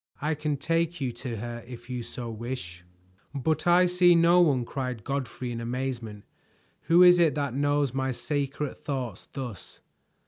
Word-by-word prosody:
"I 150 +2 0
can 150 -1 -2
take 165 +4 0
you 130 -3 -1
to 120 0 -6
her 120 +1 -6
if 120 -1 -10
you 125 -1 -4
so 120 +1 -6
wish." 110 -6 -6 0.5
"But 155 +4 0
I 175 +1 +6
see 180 0 +5
no 170 +1 +5
one!" 135 -8 +3
cried 125 -4 -4
Godfrey 130 -2 -3
in 115 0 -4
amazement. 120 -4 -4 0.6
"Who 170 +3 +7
is 180 0 +7
it 165 -3 +4
that 140 -4 -1
knows 145 -1 +1
my 130 0 -1
secret 140 +2 -3
thoughts 130 -8 -5
thus?" 125 -8 -8
135 Hz, 165 wpm, -27 LUFS, 120-155 Hz, 0.6 s, Who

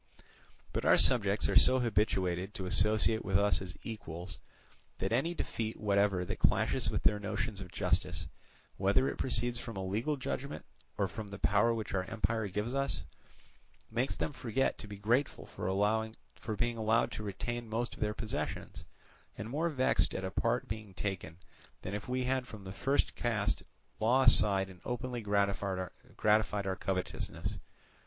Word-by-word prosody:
But - - -1
our - - +6
subjects - - +4
are - - 0
so 130 - +7
habituated 100 -5 +1
to 95 -4 -4
associate 110 +4 +3
with 95 -1 +2
us 100 -1 +3
as 90 -1 -6
equals 90 -4 -7 0.6
that 95 +4 -1
any 165 +8 +1
defeat 110 -7 -3
whatever 100 -3 +2
that - - -4
clashes - - +2
with - - -1
their 105 - +4
notions 105 0 -3
of 90 -3 -8
justice, - - 0 0.5
whether 100 +7 +3
it - - -3
proceeds 120 -1 0
from 115 -4 -6
a 95 - -3
legal 115 +10 0
judgment 140 +1 -4 0.3
or 100 - +2
from 105 +3 -6
the 100 0 -7
power 105 +5 +3
which 115 -2 -3
our 95 -1 0
empire 110 +1 0
gives 105 +5 -2
us, 135 0 0 0.9
makes 120 +4 0
them 150 - -2
forget 130 +1 0
to 105 - -8
be 100 -1 -7
grateful 120 +8 +1
for 95 +1 -3 0.8
being 120 -1 0
allowed 110 +1 +2
to - - -5
retain 115 +3 -4
most 115 +2 -1
of - - -12
their 105 -1 0
possessions, 110 -2 -4 0.5
and 110 +3 -5
more 160 +5 +1
vexed 130 -4 +2
at 95 - -2
a 95 - -3
part 115 +4 0
being 105 -3 -6
taken, 90 -5 -4 0.5
than 95 - -4
if 105 +4 -5
we 130 0 0
had 130 0 0
from 110 -4 -9
the 95 - -7
first 135 +8 +1
cast 110 -4 0 0.4
law 125 +5 +4
aside 95 -6 +5
and 95 -2 -13
openly 125 0 -3
gratified 100 -1 +1 0.2
our 100 +1 0
covetousness. 95 0 -3
105 Hz, 165 wpm, -33 LUFS, 95-120 Hz, 0.9 s, so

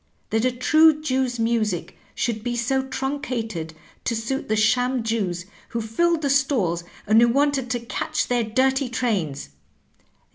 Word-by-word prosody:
That 225 +2 +1
a 255 - +3
true 310 +5 +4
Jew's 260 -4 -1
music 225 -6 -1 0.2
should 220 -3 -2
be 240 0 -2
so 250 +3 +1
truncated 250 - -4 0.3
to 235 - 0
suit 230 +5 -3
the 215 - +2
sham 245 +3 +2
Jews 195 -6 -2 0.2
who 235 - -3
filled 310 +9 +1
the 280 - +1
stalls, 240 - +1 0.2
and 220 +2 +5
who 235 - +6
wanted 275 0 +1
to 245 0 -1
catch 255 +6 -2
their 245 -1 +1
dirty 265 +4 +1
trains! 195 - -2
240 Hz, 150 wpm, -23 LUFS, 220-265 Hz, 0.3 s, who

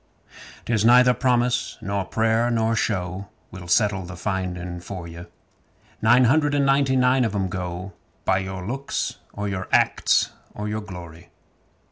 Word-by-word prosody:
'Tis 110 -3 +1
neither 125 +2 +6
promise 125 -1 0
nor 100 -2 -2
prayer 115 +4 +1
nor 115 -1 +1
show 95 -2 -2 0.2
Will 90 -2 -9
settle 100 +1 +2
the 90 +1 -8
finding 90 -2 -3
for 85 0 -7
'ee. 85 +1 -9 0.8
Nine 130 - +5
hundred 145 +3 +3
and 140 -1 +2
ninety 135 -1 +3
nine 125 0 +3
of 110 -3 -1
'em 95 -2 -1
go 90 0 -5 0.3
By 95 -1 +2
your 95 -1 -5
looks 135 +6 -3
or 105 0 -4
your 95 -2 -4
acts - - +3 0.2
or 105 0 -4
your 105 +1 -3
glory. 85 -5 -10
100 Hz, 150 wpm, -23 LUFS, 90-120 Hz, 0.8 s, neither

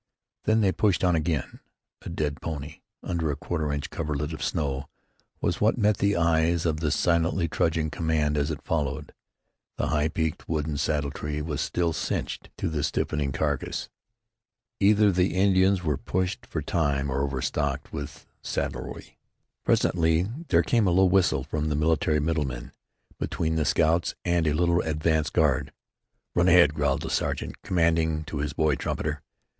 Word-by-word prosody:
Then 110 +1 +3
they 100 -3 +3
pushed 100 -2 +1
on 90 -2 +4
again. 80 -2 -2 0.4
A - - -7
dead 75 -3 -2
pony, 75 -1 -5 0.2
under 85 -3 -1
a 75 - 0
quarter 75 0 -2
inch 70 0 -3
coverlet 75 0 -3
of 80 - -5
snow, 70 -4 -2 0.5
was 85 - -1
what 110 +4 +3
met 105 -2 +3
the 100 0 +2
eyes 85 0 +2
of 80 -2 0
the 80 -1 0
silently 85 +2 +1
trudging 80 0 0
command 80 -2 0
as 70 +1 0
it 75 -2 -5
followed. 75 -4 -2 0.6
The - - -1
high 75 0 +2
peaked 80 0 -3
wooden 75 -2 -1
saddle 75 -1 0
tree 75 +1 -4
was 75 -2 -3
still 85 -2 0
"cinched" - - -3
to - - -2
the 80 -2 -2
stiffening 75 -1 -1
carcass. - - -2 0.9
Either 105 +1 +5
the 90 0 +1
Indians 95 -1 +3
were 75 -4 0
pushed 95 +5 -2
for - - -3
time 70 -4 0
or 70 - 0
overstocked 70 +1 -2
with 70 -1 -6 0.2
saddlery. - - -5 0.4
Presently 80 -1 +2 0.2
there - - +4
came 115 -6 +2
a - - +4
low 95 +2 +4
whistle 90 -8 +3
from 75 +2 -2
the 75 - 0
military 75 0 +2
"middleman" 75 -6 -2 0.5
between 80 0 -1
the 80 -2 +1
scouts 80 +3 +2
and 85 -2 +2
a 75 - +2
little 85 +2 +2
advance 80 0 0
guard. - - +1 0.6
"Run 90 +1 +3
ahead," 85 -4 +6
growled 70 -3 0
the - - -4
sergeant - - -2
commanding 80 -3 +1
to 75 -2 -5
his 75 0 -2
boy 80 0 +2
trumpeter. 75 +1 -3
80 Hz, 160 wpm, -26 LUFS, 75-85 Hz, 0.9 s, ahead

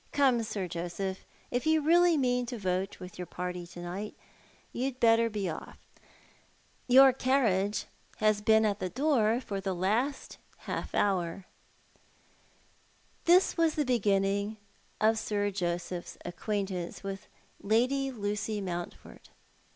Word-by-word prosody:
Come, 265 -5 +3
Sir 205 -4 -3
Joseph, 175 +3 -4 0.3
if 245 +5 -1
you 315 0 +4
really 340 +2 +4
mean 250 -2 +1
to 245 0 -5
vote 190 -1 -2
with 180 -1 -10
your 180 - -5
party 180 -1 -5
to 175 0 -11
night, 195 +5 -5 0.6
you'd 255 +1 -3
better 230 0 +4
be 205 -3 -3
off. 160 - -6 1.1
Your 265 +1 +8
carriage 220 -7 +1 0.3
has 215 -1 +2
been 220 +1 +4
at 205 -1 0
the 185 - -2
door 245 - +2
for 200 -6 -5
the 190 -1 -2
last 225 +10 -1 0.3
half - - -4
hour." 185 -2 0 1.8
This 360 +2 +5
was 330 -2 +2
the 300 - +1
beginning 200 -3 +1 0.4
of 220 +1 +3
Sir 205 -1 -1
Joseph's 175 -1 -3
acquaintance 190 -1 -3
with 195 0 -6 0.3
Lady 255 +6 +1
Lucy 210 -2 -2
Mountford. 175 -3 -7
210 Hz, 130 wpm, -30 LUFS, 190-250 Hz, 1.8 s, Your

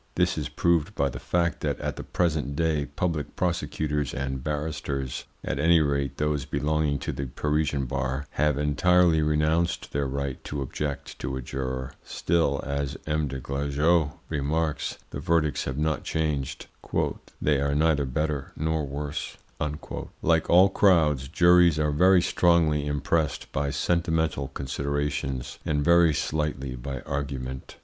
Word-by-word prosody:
This 90 0 +2
is 75 -2 -3
proved 85 +4 +1
by 70 0 +1
the - - -6
fact 85 -1 0
that - - -1
at - - -3
the - - -6
present 80 -5 0
day 75 -2 +1
public 75 +1 -2
prosecutors 75 -5 -1
and 65 -1 -3
barristers, 75 -3 -3 0.2
at - - -2
any 85 +3 +5
rate 70 -3 0
those 75 -2 0
belonging 75 -1 0
to - - -3
the 70 - -4
Parisian 75 +1 0
bar, 65 +2 -2
have 75 -1 +1
entirely 85 +3 +4
renounced 75 +3 +1
their 70 -1 0
right 70 0 -3
to 70 -1 -3
object 70 +2 -5
to 65 +1 -3
a - - -4
juror; 65 0 -4
still, 80 -5 0
as 70 0 -2
M. 75 -1 0
des 65 -1 -5
Glajeux 70 +4 +1
remarks, 75 0 -1
the - - -5
verdicts 80 -3 +1
have 65 0 -3
not 75 0 0
changed, 75 -4 -2 0.7
"they 75 -2 +2
are 70 0 +1
neither 75 -2 +3
better 75 +1 -2
nor 80 0 0
worse." 70 +1 -4 0.9
Like 80 0 +2
all 90 +3 +7
crowds, 80 -9 +3
juries 85 0 +5
are 75 -1 +1
very 90 +4 +5
strongly 80 -4 +3
impressed 75 +2 -1
by 70 +1 -1
sentimental 80 -3 0
considerations, 70 -1 -3
and 75 -2 0
very 85 -2 +5
slightly 70 -4 -2
by 65 +1 -5
argument. 70 -2 -5
75 Hz, 145 wpm, -26 LUFS, 70-80 Hz, 0.9 s, all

